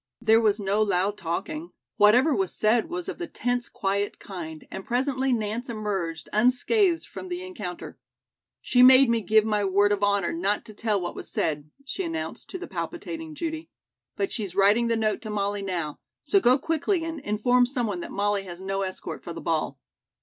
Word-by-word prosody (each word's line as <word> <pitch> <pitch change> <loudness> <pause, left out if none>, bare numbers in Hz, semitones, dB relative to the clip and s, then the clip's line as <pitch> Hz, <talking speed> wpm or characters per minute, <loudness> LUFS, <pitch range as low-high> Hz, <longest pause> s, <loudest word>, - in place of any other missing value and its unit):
There 225 -1 +4
was 215 -1 +2
no 200 +1 +1
loud 200 -1 +1
talking. 305 - -4 0.2
Whatever 240 +8 +5
was 195 -6 -1
said 225 +7 +2
was 350 +1 -4
of 385 - -5
the 345 - -4
tense 245 -4 -2
quiet 200 +1 -1
kind, 160 -5 -8
and 190 - -6
presently 260 +3 0
Nance 230 +1 -2
emerged 195 -8 -3
unscathed 330 - +3
from 370 - -8
the 355 0 -4
encounter. 210 - -7 0.6
"She 250 - +3
made 260 0 +8
me 230 -1 +2
give 220 0 +4
my 210 -2 +1
word 200 +1 +3
of 205 -1 0
honor 200 -3 +2
not 195 +5 0
to 215 - -10
tell 210 -1 0
what 175 - -4
was - - -9
said," 150 -1 -2 0.2
she 335 +8 -3
announced 330 -2 -5
to 375 - -5
the 365 - -7
palpitating 320 -3 -5
Judy, 320 +1 -4 0.5
"but 390 - -1
she's 200 -6 -4
writing 205 +4 +4
the 230 - +2
note 215 -1 0
to 220 - -7
Molly 205 -1 -1
now; 175 -6 -3 0.2
so 395 - +3
go 255 -6 +5
quickly 325 +4 0
and 325 -1 -4
inform 245 +2 +2
someone 240 -8 -1
that - - -7
Molly 205 0 0
has 175 -1 -8
no 195 +1 -2
escort 185 -1 -5
for 170 - -6
the - - -7
ball." 155 -4 -1
215 Hz, 190 wpm, -26 LUFS, 195-265 Hz, 0.6 s, made